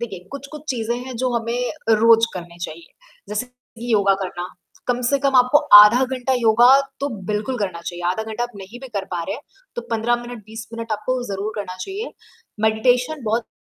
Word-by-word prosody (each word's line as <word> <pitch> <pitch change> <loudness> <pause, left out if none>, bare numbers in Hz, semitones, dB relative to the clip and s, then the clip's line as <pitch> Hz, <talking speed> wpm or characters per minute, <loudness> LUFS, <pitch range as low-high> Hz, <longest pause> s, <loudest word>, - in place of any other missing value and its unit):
देखिए, 215 -6 -5
कुछ-कुछ 280 +2 -9
चीज़ें 235 -1 -1
हैं 260 -1 -7
जो 255 +1 0
हमें 235 +2 -2 0.2
रोज़ 225 +1 +5
करने 175 -1 -8
चाहिए। 165 +2 -9 0.4
जैसे 210 +4 -2
कि 245 -1 -8
योग 200 -2 +3
करना। 180 -1 -5 0.4
कम 245 0 0
से 280 - +2
कम 275 -1 +2
आपको 250 +4 +6 0.2
आधा 220 +5 +7
घंटा 260 0 -2
योगा 235 0 +5 0.3
तो 280 - -1 0.2
बिल्कुल 215 +4 -2
करना 185 -5 -3
चाहिए। 175 0 -6
आधा 185 +5 0
घंटा 220 +2 -4
आप 240 - -8
नहीं 195 +5 -10
भी 265 - -9
कर 195 - -1
पा 175 -1 -2
रहे 195 - -3
हैं, 290 - -9 0.3
तो 240 - -3
15 230 +2 +1
मिनट, 240 -1 -8
20 220 +1 -8
मिनट 230 -1 -5
आपको 250 +4 -2
ज़रूर 200 +2 -3
करना 185 -3 -5
चाहिए। 390 - -5 0.5
मेडिटेशन 245 +6 +1
बहुत 225 +2 0
230 Hz, 195 wpm, -21 LUFS, 210-250 Hz, 0.5 s, आधा